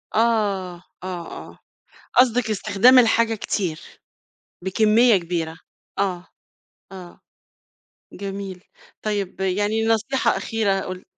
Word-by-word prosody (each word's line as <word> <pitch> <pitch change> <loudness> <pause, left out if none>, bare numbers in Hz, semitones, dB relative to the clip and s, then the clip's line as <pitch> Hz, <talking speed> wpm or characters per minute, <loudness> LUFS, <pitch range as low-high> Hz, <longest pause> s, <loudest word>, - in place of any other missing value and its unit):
آه، 200 -6 0 0.2
آه، 180 -2 -5 0.2
آه، - - -21 0.6
قصدِك 245 -2 +3
استخدام 215 +5 +4
الحاجة 230 -1 +3
كتير، 185 -6 -3 0.8
بكمية 215 +4 +4
كبيرة؟ 165 -2 -4 0.4
آه، 185 -3 -1 0.7
آه، 180 -2 -11 0.9
جميل 195 -1 -6 0.4
طيب 200 -3 -3
يعني 205 +4 0
نصيحة 225 +4 +1
أخيرة 210 -4 0
قل 185 -1 -7
200 Hz, 90 wpm, -22 LUFS, 185-225 Hz, 0.9 s, استخدام